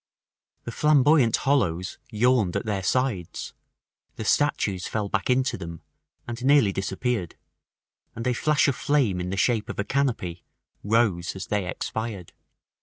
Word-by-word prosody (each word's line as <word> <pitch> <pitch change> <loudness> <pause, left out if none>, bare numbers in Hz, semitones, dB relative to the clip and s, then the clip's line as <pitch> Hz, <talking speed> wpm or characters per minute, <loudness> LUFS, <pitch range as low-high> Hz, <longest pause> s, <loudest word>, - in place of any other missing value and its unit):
The 120 - -6
Flamboyant 145 -3 +4
hollows 95 -11 0
yawned 115 -4 +2
at - - -1
their 100 -3 -1
sides, 110 -5 -1 0.6
the 110 - -6
statues 105 -9 +1
fell 105 -2 -2
back 105 +2 -1
into 130 +1 +1
them, 85 -1 -8 0.4
and 120 +1 -6
nearly 135 -6 +5
disappeared, 95 0 -2 0.8
and 115 - -5
a 125 - +2
flash 150 +5 +2
of 140 - +1
flame 120 -13 +1
in 90 - -4
the 95 - -3
shape 110 +1 +1
of - - -5
a 105 - 0
canopy 110 -10 -1 0.4
rose 105 -6 +1
as 95 -1 -5
they 100 -1 -1
expired. 110 -6 -5
110 Hz, 145 wpm, -25 LUFS, 95-130 Hz, 0.8 s, nearly